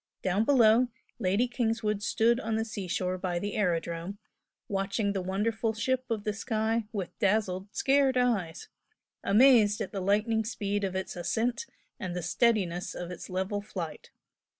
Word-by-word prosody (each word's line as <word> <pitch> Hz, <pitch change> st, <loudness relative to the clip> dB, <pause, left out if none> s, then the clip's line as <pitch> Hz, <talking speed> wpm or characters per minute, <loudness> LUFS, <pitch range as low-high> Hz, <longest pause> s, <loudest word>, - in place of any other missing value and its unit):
Down 195 Hz, +4 st, +1 dB
below 240 Hz, -2 st, +5 dB, 0.3 s
Lady 200 Hz, +6 st, +2 dB
Kingswood 225 Hz, -4 st, -1 dB
stood 230 Hz, +3 st, +2 dB
on 225 Hz, -3 st, -2 dB
the 225 Hz, 0 st, 0 dB
seashore 185 Hz, -3 st, -3 dB
by 180 Hz, -2 st, -2 dB
the 205 Hz, +4 st, -3 dB
aerodrome, 170 Hz, -1 st, -1 dB, 0.5 s
watching 200 Hz, +1 st, -1 dB
the 195 Hz, -, -1 dB
wonderful 215 Hz, +4 st, -1 dB
ship 255 Hz, +4 st, 0 dB
of 220 Hz, -3 st, -2 dB
the 210 Hz, -, -1 dB
sky 220 Hz, +1 st, -1 dB
with 195 Hz, -5 st, -5 dB
dazzled, 195 Hz, -2 st, +1 dB
scared 270 Hz, -1 st, +3 dB
eyes 205 Hz, -10 st, 0 dB, 0.6 s
amazed 215 Hz, -1 st, +5 dB
at -, -, -4 dB
the 195 Hz, -, -4 dB
lightning 215 Hz, +4 st, +2 dB
speed 205 Hz, -2 st, -2 dB
of 190 Hz, -1 st, -2 dB
its 190 Hz, 0 st, -3 dB
ascent 235 Hz, -, -1 dB, 0.3 s
and 180 Hz, -2 st, -4 dB
the 180 Hz, -, -3 dB
steadiness 180 Hz, -2 st, +1 dB
of 175 Hz, 0 st, -5 dB
its 180 Hz, -, -8 dB
level 190 Hz, +2 st, -2 dB
flight. 180 Hz, -6 st, -7 dB
205 Hz, 150 wpm, -29 LUFS, 185-225 Hz, 0.6 s, below